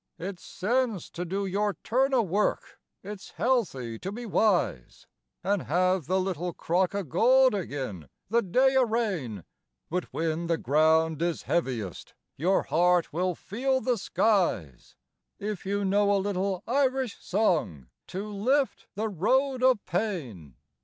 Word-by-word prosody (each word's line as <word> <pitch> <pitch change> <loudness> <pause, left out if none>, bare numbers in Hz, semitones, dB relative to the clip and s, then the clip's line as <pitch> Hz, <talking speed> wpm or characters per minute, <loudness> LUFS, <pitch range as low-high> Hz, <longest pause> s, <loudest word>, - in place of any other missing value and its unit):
It's 185 +1 -6
sense 230 -1 -1
to 175 - -4
do 195 +3 -2
your 200 +2 0
turn 265 +4 +2
o' 240 - +4
work, 200 +2 -1 0.2
it's 195 -2 -9
healthy 140 - -1
to 195 - -5
be 240 +3 -6
wise, 190 - 0 0.4
An' 200 +2 +1
have 185 0 +1
the 185 +2 +2
little 180 -2 -2
crock 180 +3 0
o' 200 - -1
gold 250 - +4
agin 130 - -4 0.2
the 235 +4 +2
day 260 +7 +3
o' 265 - +5
rain; 190 - -2 0.5
But 180 +1 -1
whin 165 +1 -2
the 165 -1 +1
ground 160 +3 +2
is 170 -1 -1
heaviest, 120 - -2 0.2
your 185 +6 +2
heart 175 -1 +2
will 180 +2 0
feel 260 +9 -1
the 255 -1 +1
skies, 175 - 0 0.4
If 205 -3 -5
you 200 0 0
know 200 +1 +3
a 200 - +4
little 195 -1 -1
Irish 260 -2 0
song 165 - 0 0.2
to 195 +3 -5
lift 255 +7 0
the 215 +2 -1
road 255 - +1
o' 260 0 +6
pain. 160 - -4
190 Hz, 145 wpm, -27 LUFS, 165-220 Hz, 0.5 s, o